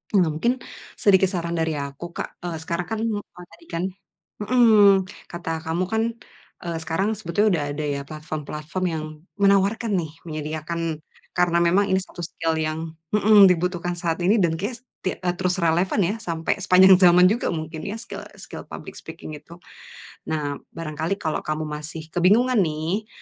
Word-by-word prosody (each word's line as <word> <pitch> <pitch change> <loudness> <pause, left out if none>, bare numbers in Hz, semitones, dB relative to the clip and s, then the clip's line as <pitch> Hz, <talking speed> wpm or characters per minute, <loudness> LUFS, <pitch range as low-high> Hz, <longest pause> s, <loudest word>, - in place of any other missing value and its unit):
Nah, 185 -4 +5
mungkin 235 +12 0 0.4
sedikit 190 -2 +4
saran 170 -3 -2
dari 160 -1 0
aku, 145 +4 -6
Kak, - - -6
eee, 175 -2 -4
sekarang 170 +1 -3
kan, 220 - -2
eee, 205 -5 -4
tadi 335 - -17
kan 165 +1 -2 0.6
mhm, 220 -2 +6 0.4
kata 165 -2 -3
kamu 165 +3 0
kan, 220 0 +2 0.6
eee, 170 -1 -2
sekarang 165 +7 0
sebetulnya 205 +2 +1
sudah 165 -5 +1
ada 150 0 -3
ya 140 - -3
platform-platform 155 +2 -5
yang 160 -2 -3 0.3
menawarkan 200 +3 +3
nih 160 -3 -5
menyediakan 155 0 -4 0.3
karena 175 -1 +3
memang 190 +4 +3
ini 190 -1 +2
satu 185 - -15
skill 165 0 -2
yang 160 +1 -2 0.2
mhm, 210 -1 +7
dibutuhkan 175 0 0
saat 170 -1 -2
ini 205 +5 +4
dan 165 -1 +1
kayaknya 230 +6 -4 0.2
tia 185 - -1
eee, 180 -1 +1
terus 180 -1 +1
relevan 170 +5 +2
ya 190 +5 0
sampai 165 -6 -2
sepanjang 190 0 +7
zaman 180 -1 +7
juga 235 - 0
mungkin 160 0 -5
ya, 205 - -3
skill 235 - -8 0.2
skill - - -9
public - - -9
speaking 155 - -9
itu. 155 +3 -14 0.8
Nah, 145 -2 -2 0.2
barangkali 160 +2 -2
kalau 155 -2 -1
kamu 155 +1 -2
masih 150 +1 -6
kebingungan 220 +8 +4
nih, 165 +5 -1
170 Hz, 165 wpm, -23 LUFS, 160-195 Hz, 0.8 s, mhm